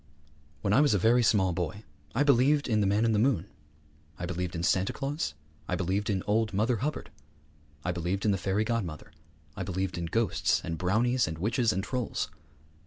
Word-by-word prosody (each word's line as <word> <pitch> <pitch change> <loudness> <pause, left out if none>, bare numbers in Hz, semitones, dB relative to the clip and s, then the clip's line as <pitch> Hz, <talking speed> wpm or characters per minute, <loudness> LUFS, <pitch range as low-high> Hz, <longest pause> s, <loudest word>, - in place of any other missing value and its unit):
When 100 - +1
I 130 - +6
was 145 -7 +4
a - - +4
very 115 +6 +4
small 100 -5 +3
boy 90 +5 -3 0.3
I 140 - +3
believed 140 +1 +4
in 110 -3 +2
the 100 - +2
Man 105 +3 +2
in 115 - +3
the 105 - +2
Moon; 110 -8 +2 0.7
I 90 - -4
believed 90 0 -3
in 85 - -3
Santa 95 0 +2
Claus; 145 +3 -3 0.3
I 90 - 0
believed 95 +4 -1
in 95 -3 0
old 105 -1 +1
Mother 115 +4 +2
Hubbard; 145 +7 -3 0.7
I 90 - +1
believed 90 +4 -2
in 105 - +4
the 95 - 0
Fairy 95 +4 0
Godmother; 110 -9 -3 0.4
I 105 - -5
believed 95 -1 -2
in 85 - -2
ghosts 115 +6 +1
and 80 -1 -4
brownies 115 +6 +2
and 80 0 -4
witches 115 - +1
and 95 -2 -2
trolls. 125 -5 -2
105 Hz, 195 wpm, -29 LUFS, 90-115 Hz, 0.7 s, I